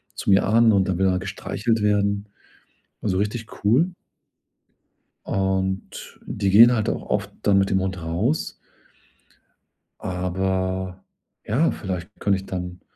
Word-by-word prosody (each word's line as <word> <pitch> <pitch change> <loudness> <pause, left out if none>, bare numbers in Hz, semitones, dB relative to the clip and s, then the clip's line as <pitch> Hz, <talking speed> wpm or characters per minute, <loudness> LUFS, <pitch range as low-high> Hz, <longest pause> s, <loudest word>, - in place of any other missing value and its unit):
zu - - -4
mir 95 0 +5
an 115 +1 +5
und 95 -1 +2
dann 90 - 0
will 95 0 +2
er 90 0 +1
gestreichelt 100 +4 -2
werden. 100 0 +1 0.7
Und 105 - -1
so 95 - 0
richtig 110 +3 -2 0.2
cool. 135 - +4 1.3
Und 95 0 -2
die 100 -1 -1
gehen 115 +5 +8
halt 110 -3 0
auch - - -3
oft - - -1
dann 100 -1 +4
mit 95 0 +2
dem 95 - +2
Hund 95 -2 -3
raus. 90 - -1 1.5
Aber 95 0 -2 0.4
ja, 135 +10 +2
vielleicht 90 -2 -5
könnte 100 -1 +2
ich 95 - -8
dann, 90 -1 -6
95 Hz, 140 wpm, -23 LUFS, 95-105 Hz, 1.5 s, gehen